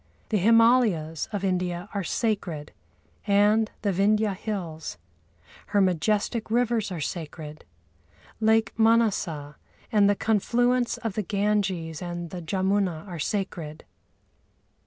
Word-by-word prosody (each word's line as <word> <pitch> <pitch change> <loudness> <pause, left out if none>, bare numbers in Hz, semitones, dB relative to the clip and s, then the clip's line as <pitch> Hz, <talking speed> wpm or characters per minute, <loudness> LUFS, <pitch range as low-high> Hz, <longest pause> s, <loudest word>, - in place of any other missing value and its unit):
The 215 - +1
Himâlayas 220 -8 +3
of 205 -2 -3
India 180 -1 -1
are 200 -2 -2
sacred 175 -7 -2 0.6
and 210 +2 +4
the 200 - +2
Vindhya 210 +2 +2
Hills. 175 - -5 0.7
Her 205 - +1
majestic 205 +5 +1
rivers 230 -3 +1
are 175 - -4
sacred. 155 -1 -6 0.7
Lake 220 -1 +3
Mânasa 200 -10 +2 0.3
and 205 -2 +4
the 205 - +3
confluence 240 +4 +1
of 225 -3 -4
the 215 - -1
Ganges 195 -5 -1
and 175 -1 -5
the 180 - -6
Jamuna 190 0 0
are 175 -3 -7
sacred. 165 -4 -4
200 Hz, 115 wpm, -26 LUFS, 170-220 Hz, 0.7 s, and